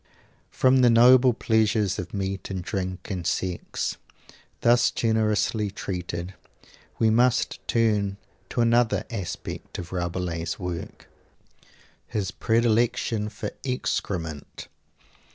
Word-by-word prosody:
From 130 0 +3
the 125 -1 +6
noble 125 +2 +7
pleasures 110 -3 +1
of - - -5
meat 95 -1 -3
and 95 -2 -4
drink 95 0 -4
and 90 -3 -3
sex, 90 -1 -2 0.6
thus 120 +1 +5
generously 110 -1 +1
treated; 90 -2 -5 0.6
we 110 -1 +3
must 120 +2 +2
turn 105 -4 +1 0.3
to 120 - 0
another 115 0 +3
aspect 100 -7 -6
of 90 -1 -7
Rabelais' 85 -1 -2
work 90 -3 -6 1.0
his 100 -4 -2
predilection 115 -1 +1
for 110 +3 -5
excrement. 85 - -3
105 Hz, 100 wpm, -25 LUFS, 90-115 Hz, 1.0 s, noble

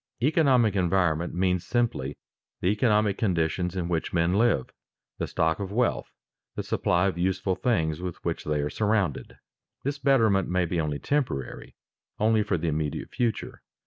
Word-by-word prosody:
_ - - +2
Economic 130 - +3
environment 90 -3 +1
means 90 -1 +1
simply 115 - -1 0.4
the 90 - +1
economic 105 -1 +2
conditions 90 -2 0
in 90 -2 -2
which 85 -2 -2
men 85 0 +2
live, 105 - +2 0.5
the - - -1
stock 80 +2 0
of 100 -1 -4
wealth, 120 +3 0 0.5
the - - -3
supply 90 +1 +1
of 95 -3 -1
useful 95 +1 0
things 90 -7 0
with 90 -2 -4
which - - -2
they 75 -1 -1
are 75 - -1
surrounded. 105 -7 -1 0.5
This 140 +1 -2
betterment 110 -10 +3
may 90 0 +1
be 85 0 -1
only 75 -2 -2
temporary, 120 - -3 0.4
only 110 0 +3
for 100 -3 0
the 85 +1 -3
immediate 75 -1 -2
future. 115 -3 -2
95 Hz, 160 wpm, -26 LUFS, 85-110 Hz, 0.5 s, Economic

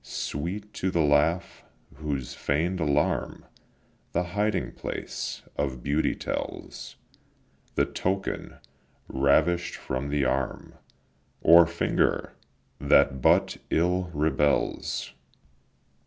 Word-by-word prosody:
Sweet 95 +8 -4
too 95 - -1
the 85 -3 +2
laugh, 75 +4 +1 0.3
whose 70 -5 -3
feign'd 85 +6 -1
alarm 75 -2 0 0.7
The 90 - +1
hiding 105 +1 0
place - - -5
of 65 -4 -2
beauty 75 +3 +1
tells, - - -5 0.8
The - - +3
token, 95 +1 -3 0.5
ravish'd 85 +6 +2
from 65 +2 -4
the 70 -1 +1
arm 65 +1 -2 0.7
Or 85 +1 +8
finger, 85 0 0 0.5
that 70 -1 +4
but - - +3
ill 90 +2 +1
rebels. 75 -1 0
75 Hz, 95 wpm, -27 LUFS, 70-90 Hz, 0.8 s, Or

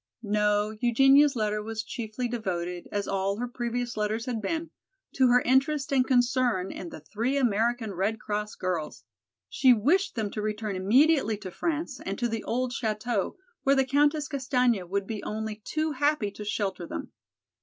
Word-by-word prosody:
No, 210 0 +1
Eugenia's 270 +4 +5
letter 210 -2 0
was 220 0 -4
chiefly 230 +1 -4
devoted, 180 -7 -3
as 205 -1 -2
all 195 +1 -1
her 245 +2 -2
previous 240 0 -3
letters 215 +2 -1
had 240 -4 -3
been, 325 +9 -3 0.4
to 260 -1 +4
her 250 0 +5
interest 275 +2 +2
and 260 -2 +4
concern 245 -6 +2
in 175 - -7
the 155 - -10
three 230 - -1
American 230 -2 +1
Red 200 +5 -1
Cross 210 0 -3
girls. 180 -4 -3 0.4
She 260 -2 +5
wished 335 - +2
them 215 -3 -2
to 210 - -4
return 210 -1 -3
immediately 225 +4 +3
to 195 -3 -8
France 310 - -3
and 195 +1 -4
to 240 - 0
the 225 -1 -3
old 250 +1 -1
chateau, 220 - -2 0.2
where 275 0 +3
the 270 -1 +3
Countess 290 +2 +2
Castaigne 250 -6 +1
would 195 +3 -2
be 215 0 -5
only 220 0 -4
too 310 0 -1
happy 290 -6 +1
to 210 - -8
shelter 195 -4 -2
them. 85 - -6
225 Hz, 170 wpm, -27 LUFS, 210-260 Hz, 0.4 s, Eugenia's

